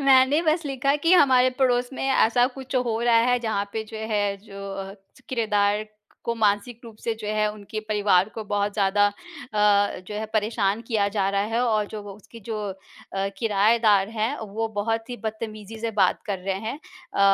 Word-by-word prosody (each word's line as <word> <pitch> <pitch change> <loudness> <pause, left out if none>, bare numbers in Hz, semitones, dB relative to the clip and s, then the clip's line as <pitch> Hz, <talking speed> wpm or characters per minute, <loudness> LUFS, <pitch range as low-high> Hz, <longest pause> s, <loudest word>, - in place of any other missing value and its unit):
मैंने 270 +2 +5
बस 320 0 +1
लिखा 275 0 +1
कि 335 - +5
हमारे 260 -7 +6
पड़ोस 245 -2 +2
में 270 - -3
ऐसा 245 -1 +4
कुछ 265 0 -4
हो 235 -3 0
रहा 235 -1 +4
है 245 - +3
जहाँ 205 -3 -1
पे 220 -1 -3
जो - - -5 0.2
है 205 0 +2 0.2
जो 200 -1 -7
अ, 195 0 -6 0.3
किरायेदार 210 -3 +1 0.4
को 235 - -1
मानसिक 220 +2 0
रूप 225 -2 -11
से 230 - -1
जो - - -6
है 215 0 +1
उनके 215 +1 -6
परिवार 205 -2 +3
को 220 - -4
बहुत 205 0 -1
ज़्यादा 205 0 +3
अ, 205 -1 0
जो 210 - -6
है 215 +1 -3
परेशान 215 -1 +1
किया 215 -4 +2
जा 200 -1 0
रहा 200 0 +1
है 235 - +2
और 215 -3 +1
जो 215 +1 -7
उसकी 210 +3 -14
जो 220 - -2
अ, 195 +1 -6
किराएदार 210 -1 +3
हैं 225 +5 -1
वो 220 +2 -3
बहुत 225 +3 -1
ही 245 - -4
बदतमीज़ी 215 0 -5
से 230 0 -1
बात 195 -4 +2
कर 200 -3 -2
रहे 190 +1 -2
हैं। 220 +3 -4 0.4
अ, - - 0
215 Hz, 190 wpm, -24 LUFS, 205-235 Hz, 0.4 s, हमारे